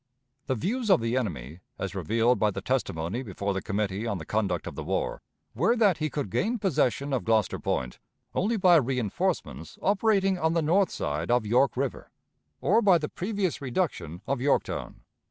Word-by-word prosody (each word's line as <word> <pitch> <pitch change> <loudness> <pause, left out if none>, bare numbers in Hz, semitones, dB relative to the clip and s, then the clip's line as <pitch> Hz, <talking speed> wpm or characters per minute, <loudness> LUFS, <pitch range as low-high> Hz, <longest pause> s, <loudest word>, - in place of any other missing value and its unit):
The 130 - +1
views 220 - -2
of 190 - +6
the 115 +1 -1
enemy, 80 - -3 0.2
as 100 - -4
revealed 115 +7 +1
by 105 - +3
the 100 - -4
testimony 100 -3 -2
before 100 -3 -3
the 95 - -2
Committee 100 +2 -2
on 100 - -1
the 80 - -8
Conduct 100 -4 -1
of - - -6
the - - -6
War, - - -2 0.3
were 180 - +2
that 210 -7 +3
he 155 0 -1
could 145 -11 -4
gain 225 - 0
possession 140 - 0
of 130 - 0
Gloucester 110 -4 +1
Point 60 -1 -2 0.3
only 220 +4 +1
by 180 -4 +6
reënforcements 120 - -2
operating 195 -2 +2
on 160 0 +1
the 165 -1 +1
north 185 +5 +3
side 75 +3 -3
of 120 -2 +2
York 125 +5 +2
River, 135 0 -3 0.5
or 230 - +4
by 195 -5 +6
the 150 -2 -4
previous 190 -4 -2
reduction 120 - -2
of 135 -3 -1
Yorktown. 140 +2 -1
125 Hz, 180 wpm, -27 LUFS, -, 0.5 s, of